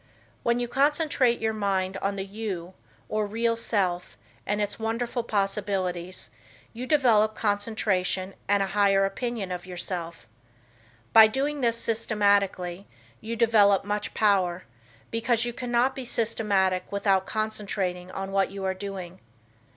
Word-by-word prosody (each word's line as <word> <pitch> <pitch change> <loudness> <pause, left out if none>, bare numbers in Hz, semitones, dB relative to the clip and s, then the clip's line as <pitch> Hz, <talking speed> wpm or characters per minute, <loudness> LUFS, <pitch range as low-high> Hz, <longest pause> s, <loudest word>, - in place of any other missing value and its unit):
When 235 0 +1
you 240 - -1
concentrate 275 -2 +2
your 220 0 0
mind 195 -3 -1
on 200 +1 -1
the 195 -1 -4
"you" 195 -4 -5 0.3
or 215 -1 -1
real 230 +2 0
self, 185 -6 -1 0.3
and 205 +1 0
its 205 +1 -2
wonderful 230 +2 -1
possibilities, 195 -4 -2 0.4
you 245 +3 -6
develop 225 -7 +4
concentration 205 -3 0
and 200 0 +3
a 195 - -4
higher 200 -1 +4
opinion 210 -1 -3
of 180 0 -5
yourself. 175 -4 -5 0.9
By 220 -1 +10
doing 280 +5 -2
this 235 -2 +1
systematically, 200 -5 +1 0.3
you 230 +1 -5
develop 210 -4 +4
much 205 0 -3
power, 185 -4 +2 0.5
because 230 +1 +1
you 240 - -3
cannot 245 +2 +1
be 265 - -6
systematic 200 -6 0
without 195 -2 +1
concentrating 200 -4 -3
on 195 +1 -5
what 195 0 +2
you 195 0 -6
are 190 - +1
doing. 190 -2 -7
205 Hz, 135 wpm, -26 LUFS, 190-230 Hz, 0.9 s, By